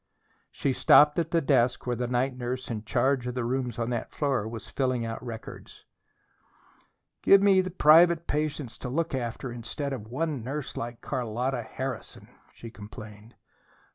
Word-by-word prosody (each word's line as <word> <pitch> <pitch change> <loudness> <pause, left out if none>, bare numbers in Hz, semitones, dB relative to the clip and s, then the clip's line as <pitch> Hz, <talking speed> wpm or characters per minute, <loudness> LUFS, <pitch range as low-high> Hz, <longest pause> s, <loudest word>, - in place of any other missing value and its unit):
She 135 - -1
stopped 150 +4 +6
at 165 -1 -1
the 165 0 +2
desk 125 -3 +2
where 125 -1 -1
the 120 +1 -2
night 125 +2 0
nurse 125 0 -4
in 110 -1 -5
charge 130 +2 +1
of 125 - -4
the 125 - -1
rooms 125 -1 -2
on 120 0 -2
that 120 -2 -3
floor 135 -7 -1
was 115 -1 -7
filling 130 -3 -1
out 115 +1 -5
records. 115 -3 -9 1.4
"Give 195 - +7
me 195 -1 +5
twelve 185 -1 -7
private 165 +2 +6
patients 150 -4 -3
to 125 - -5
look 165 +5 -1
after 125 0 -3
instead 135 +4 -5
of 110 -5 -6
one 140 +1 -2
nurse 140 +3 -5
like 120 0 -5
Carlotta 125 +1 -2
Harrison!" 125 -1 -6 0.2
she 115 - -11
complained. 105 +1 -11
125 Hz, 165 wpm, -27 LUFS, 120-145 Hz, 1.4 s, Give